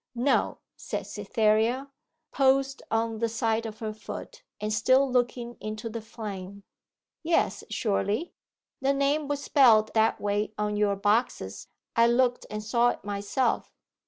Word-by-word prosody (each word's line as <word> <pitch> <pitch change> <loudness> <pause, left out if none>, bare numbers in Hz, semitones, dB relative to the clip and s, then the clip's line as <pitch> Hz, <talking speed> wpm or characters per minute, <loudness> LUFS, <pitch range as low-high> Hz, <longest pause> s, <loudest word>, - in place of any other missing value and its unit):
'No,' 250 +4 +1 0.2
said - - -5
Cytherea, 225 +5 +1 0.4
poised 270 0 +2
on 225 0 0
the 230 0 +1
side 225 0 0
of 215 -1 -8
her 215 -1 -4
foot, - - -9 0.2
and 210 +1 -2
still 260 +5 +4
looking 240 -1 -1
into 215 +1 -5
the 230 +1 -5
flame. 200 -3 -7 0.6
'Yes, 330 0 +1
surely? 210 - -1 0.5
The 270 +1 +2
name 280 +2 +1
was 285 -1 -2
spelt 225 -7 +5
that 220 0 +3
way 205 +1 -1
on 210 0 -1
your 205 -1 +2
boxes: 205 - 0 0.3
I 230 0 +5
looked 245 +1 +2
and 215 0 -5
saw 235 +3 +3
it - - -5
myself. 205 +5 -1
225 Hz, 140 wpm, -27 LUFS, 215-255 Hz, 0.6 s, spelt